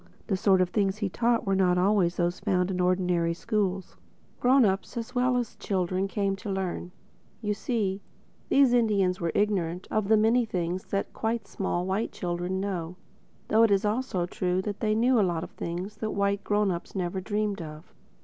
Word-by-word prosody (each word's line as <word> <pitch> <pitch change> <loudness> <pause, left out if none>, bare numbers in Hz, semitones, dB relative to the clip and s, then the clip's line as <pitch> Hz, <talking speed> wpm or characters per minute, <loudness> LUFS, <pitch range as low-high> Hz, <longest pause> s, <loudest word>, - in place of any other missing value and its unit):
The 195 - 0
sort 190 0 +3
of 180 - +2
things 195 -1 +1
he 210 -2 -1
taught 235 +4 +1
were 195 - +1
not 180 -2 +3
always 185 -2 +2
those 175 0 0
you - - -2
find 180 0 +2
in 180 -1 -1
ordinary 180 -2 +1
schools. 195 -2 -2 0.4
Grown 255 0 +5
ups 195 +3 -1
as 235 +2 -5
well 250 0 +2
as 240 -2 -3
children 185 0 -1
came 195 -1 -1
to 205 - -7
learn. 190 -2 -3 0.5
You 210 -2 -1
see, 205 -3 -2 0.5
these 270 -3 +5
Indians 200 -6 +2
were 170 -1 0
ignorant 185 -4 0
of 215 -2 0
many 225 +3 +4
of 235 - -3
the - - -26
things 180 +1 -2
that 195 - -3
quite 225 -1 -2
small 180 -2 -2
white 195 +4 -1
children 175 +1 -3
know—though 185 +3 -3
it 230 - +6
is 200 +1 +2
also 210 -5 0
true 180 +1 -1
that 205 -1 -4
they 215 -1 +1
knew 240 +2 +3
a - - +5
lot 175 -3 0
that 190 +6 -4
white 200 0 0
grown 205 -1 +1
ups 170 +3 -6
never 185 0 -2
dreamed 205 -1 -2
of. 155 +1 -10
195 Hz, 190 wpm, -27 LUFS, 180-215 Hz, 0.5 s, it